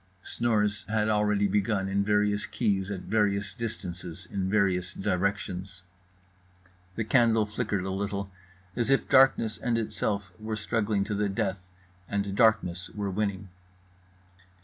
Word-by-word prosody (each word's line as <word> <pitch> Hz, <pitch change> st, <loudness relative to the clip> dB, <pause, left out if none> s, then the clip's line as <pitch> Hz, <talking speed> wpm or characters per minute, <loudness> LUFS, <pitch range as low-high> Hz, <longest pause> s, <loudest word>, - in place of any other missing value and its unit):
Snores 105 Hz, -3 st, 0 dB
had 110 Hz, 0 st, +1 dB
already 105 Hz, -1 st, +2 dB
begun 100 Hz, 0 st, 0 dB
in 100 Hz, +1 st, +1 dB
various 105 Hz, 0 st, +1 dB
keys 100 Hz, -4 st, 0 dB
at 100 Hz, -3 st, -4 dB
various 105 Hz, -2 st, 0 dB
distances 90 Hz, -5 st, -5 dB
in 95 Hz, -1 st, -1 dB
various 95 Hz, -3 st, +1 dB
directions. 95 Hz, -1 st, -2 dB, 1.1 s
The 110 Hz, -, -1 dB
candle 115 Hz, -1 st, +3 dB
flickered 105 Hz, -3 st, -2 dB
a 95 Hz, -, -2 dB
little; 100 Hz, 0 st, -3 dB, 0.4 s
as 120 Hz, 0 st, 0 dB
if 135 Hz, -, +3 dB
darkness 130 Hz, -4 st, +4 dB
and 120 Hz, -2 st, 0 dB
itself 100 Hz, -4 st, -2 dB
were 110 Hz, 0 st, -3 dB
struggling 105 Hz, -1 st, 0 dB
to 105 Hz, +2 st, -3 dB
the 105 Hz, 0 st, 0 dB
death, 95 Hz, -3 st, -2 dB, 0.4 s
and 100 Hz, -1 st, -1 dB
darkness 100 Hz, -5 st, +2 dB
were 100 Hz, -2 st, -2 dB
winning. 100 Hz, -1 st, -2 dB
100 Hz, 130 wpm, -28 LUFS, 95-110 Hz, 1.1 s, darkness